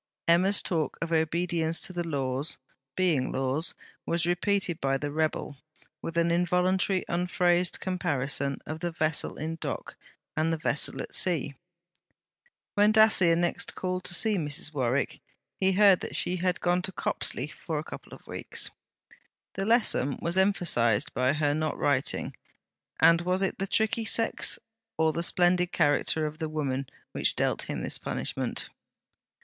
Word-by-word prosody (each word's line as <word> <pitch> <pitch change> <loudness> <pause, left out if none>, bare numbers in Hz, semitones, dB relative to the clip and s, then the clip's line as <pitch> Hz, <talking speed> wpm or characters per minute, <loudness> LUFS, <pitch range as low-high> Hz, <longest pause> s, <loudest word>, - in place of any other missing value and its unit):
Emma's 185 +4 +4
talk 160 -4 -1
of 165 0 -4
obedience 165 0 0
to 185 - -6
the 175 -1 -2
Laws, 140 -2 -2 0.4
being 165 -9 +1
Laws, 135 +5 0 0.3
was 170 -1 0
repeated 175 -1 0
by 135 0 +1
the 145 +1 -4
rebel, 155 -2 -2 0.4
with 165 0 -5
an 170 0 +3
involuntary 180 +2 +1
unphrased 175 0 +1
comparison 140 -7 -1
of 155 +1 -5
the 175 - -2
vessel 155 -2 -1
in 160 +2 -4
dock - - -5 0.4
and 160 +1 +1
the 165 - 0
vessel 150 -1 -2
at - - -11
sea. 160 -6 -1 1.2
When 205 +1 +4
Dacier 215 -6 +5
next 175 0 0
called 185 0 -3
to 175 - +1
see 215 0 +3
Mrs. 150 -1 -2
Warwick, 130 -1 -1 0.4
he 190 0 +3
heard 195 -1 +6
that - - -5
she 180 - +3
had 180 0 -1
gone 180 0 +2
to 190 - -4
Copsley - - 0
for - - -5
a - - -2
couple - - -10
of - - -12
weeks. - - -4 0.8
The 195 +1 -3
lesson 225 - +3
was 170 +1 0
emphasized 175 - +3
by 130 +2 +2
her 145 -1 +1
not 155 +1 -2
writing: 140 0 0 0.6
and 170 0 +6
was 180 +2 0
it 190 - -2
the 195 - -2
tricky 220 +2 0
sex, 225 +2 +3 0.4
or 160 0 +2
the 170 - -2
splendid 180 +1 +2
character 155 0 +1
of 155 +1 -5
the 160 -2 -3
woman, 140 -3 -2 0.2
which - - +1
dealt - - -1
him - - -3
this - - -2
punishment? - - -3
170 Hz, 155 wpm, -28 LUFS, 150-185 Hz, 1.2 s, heard